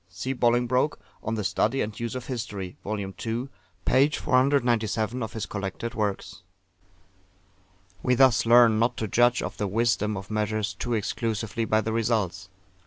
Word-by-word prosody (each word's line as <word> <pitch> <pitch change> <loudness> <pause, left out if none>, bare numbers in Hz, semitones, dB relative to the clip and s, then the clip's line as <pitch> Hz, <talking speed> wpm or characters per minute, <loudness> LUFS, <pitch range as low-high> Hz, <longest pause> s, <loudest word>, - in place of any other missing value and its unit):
[See 95 +9 -4
Bolingbroke, 125 +3 +1 0.2
On 110 +1 -2
the 105 - -2
Study 115 +6 +1
and 105 0 -3
Use 115 +1 -3
of 125 -1 -5
History, 105 -7 -5
vol. 105 +1 -3
ii. 95 -1 -5 0.7
p. 135 +3 +4
497 125 -5 +1
of 110 - -4
his 110 - -3
collected 100 +3 -5
works.] 105 -2 -3 1.6
We 125 - +2
thus 125 -3 +4
learn 115 -2 +6
not 115 +2 +1
to 110 - -2
judge 120 +4 +3
of - - -5
the 105 - -1
wisdom 110 0 +1
of 95 +2 -8
measures 110 -1 -1
too 120 +4 -2
exclusively 110 +1 -2
by 110 0 +2
the 110 +1 -3
results. 105 -5 -1
110 Hz, 155 wpm, -26 LUFS, 105-120 Hz, 1.6 s, learn